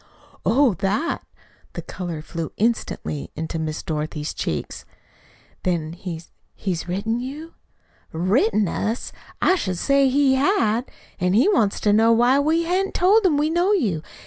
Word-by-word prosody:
"Oh, 260 -1 +4
THAT!" 200 - -1 0.5
The - - -6
color 170 -4 -6
flew 165 0 -5
instantly 220 -9 -1
into 160 +1 -4
Miss 155 -1 -3
Dorothy's 150 -1 -3
cheeks. 75 - -4 0.8
"Then 165 -3 -1
he's 170 -2 -8 0.2
he's 180 -3 -3
written 205 +6 -1
you?" 290 +6 -7 0.6
"Written 205 +4 +2
us! 220 +7 -2 0.3
I - - +5
should 185 - -2
say 275 +5 +3
he 275 0 +3
had! 265 - +1 0.3
An' 180 +1 +1
he 240 - +4
wants 225 - +2
to 205 - +3
know 225 +2 +5
why 245 +4 +4
we 320 +4 +2
hain't 370 +3 -1
told 405 +5 +4
him 300 -5 +2
we 300 +2 +1
know 350 +5 +2
you. 205 - 0
220 Hz, 145 wpm, -22 LUFS, 175-285 Hz, 0.8 s, I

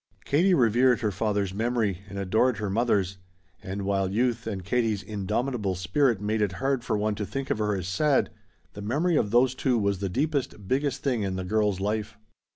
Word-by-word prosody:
Katie 180 +6 +3
revered 125 0 +3
her 105 -2 0
father's 100 -1 -1
memory 110 -3 0
and 100 - -7
adored 110 +6 +2
her 105 -3 -3
mother's, 100 -4 +1 0.4
and 100 +1 -5
while 95 -1 0
youth 120 +2 0
and 95 -4 -4
Katie's 110 -1 0
indomitable 105 0 -2
spirit 115 - +1
made 105 +2 -1
it 100 -3 +1
hard 135 +4 -1
for 110 -4 0
one 105 +1 0
to 105 - -4
think 135 +6 -4
of - - 0
her 105 -1 +1
as 90 -2 -4
sad, 135 +9 +2 0.4
the 105 - -8
memory 150 - +1
of 105 - +2
those 120 +3 +4
two 130 -1 +1
was 100 -3 0
the 100 -1 -2
deepest, 135 - -2
biggest 140 +4 0
thing 125 -5 0
in 95 -2 -2
the 95 0 -4
girl's 105 -1 +1
life. 105 +1 -2
105 Hz, 195 wpm, -26 LUFS, 100-125 Hz, 0.4 s, those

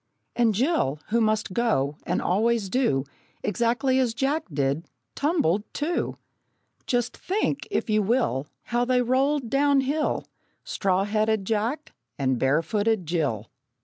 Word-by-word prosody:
And 230 -3 +3
Jill, 240 - +1
who 230 +2 +2
must 215 -3 +1
go 165 - +1
And - - 0
always 215 +2 +1
do 185 - +1 0.4
Exactly 245 +4 +1
as 240 -3 +1
Jack 285 +5 0
did, 140 +3 -1 0.3
tumbled 280 - +1
too! 325 +4 -1 0.7
Just 245 -1 0
think, 400 +4 -1
if 405 - -1
you 215 -1 +2
will, 205 - +1 0.2
How 240 0 0
they 250 0 +2
rolled 265 +1 +1
down 280 0 +4
hill 295 +3 -1 0.4
Straw 195 - 0
headed 215 0 0
Jack 225 +8 -2 0.2
and 130 -3 0
bare 140 +6 +2
footed 210 +2 0
Jill! 145 - -1
225 Hz, 135 wpm, -25 LUFS, 185-265 Hz, 0.7 s, down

